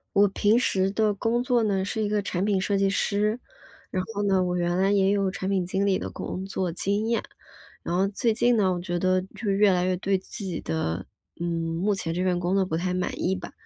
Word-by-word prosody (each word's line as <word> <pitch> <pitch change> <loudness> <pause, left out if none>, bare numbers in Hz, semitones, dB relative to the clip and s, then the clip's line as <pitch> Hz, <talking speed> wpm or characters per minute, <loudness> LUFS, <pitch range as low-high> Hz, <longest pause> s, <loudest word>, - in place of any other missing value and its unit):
我 200 0 +5
平 205 +3 +3
时 190 -6 +2
的 215 0 +2
工 230 +4 0
作 245 -2 +2
呢， 195 -3 +1
是 220 +3 -2
一 210 - +1
个 210 0 +1
产 190 -1 -2
品 200 -3 +1
设 200 0 +1
计 195 0 +2
师， 210 +3 +1 0.5
然 185 - 0
后 205 - -2
呢， 195 -2 +3
我 180 0 -1
原 175 0 0
来 190 +1 +3
也 195 -1 +3
有 200 -1 +2
产 190 0 -4
品 190 -2 +1
经 190 +3 0
理 195 -2 +2
的 - - -4
工 185 - -5
作 190 -2 -2
经 200 +5 -1
验。 230 - +1 0.6
然 - - -3
后 195 +1 +3
最 220 +3 0
近 240 +2 +3
呢， 195 -4 +3
我 175 - -3
觉 175 0 -3
得 185 +1 +2
就 220 - -3
越 200 0 +4
来 180 -1 +1
越 185 0 +1
对 195 +1 +1
自 195 +2 -8
己 180 -3 -3
的 95 - -2 0.4
呃， - - -1
目 170 +4 0
前 175 -4 -3
这 180 +2 -1
份 180 -1 +1
工 175 +2 0
作 195 -1 +3
不 160 -3 -2
太 180 +1 -1
满 180 0 -1
意 190 +2 +1
吧， 180 - -8
190 Hz, 265 characters per minute, -26 LUFS, 180-205 Hz, 0.6 s, 我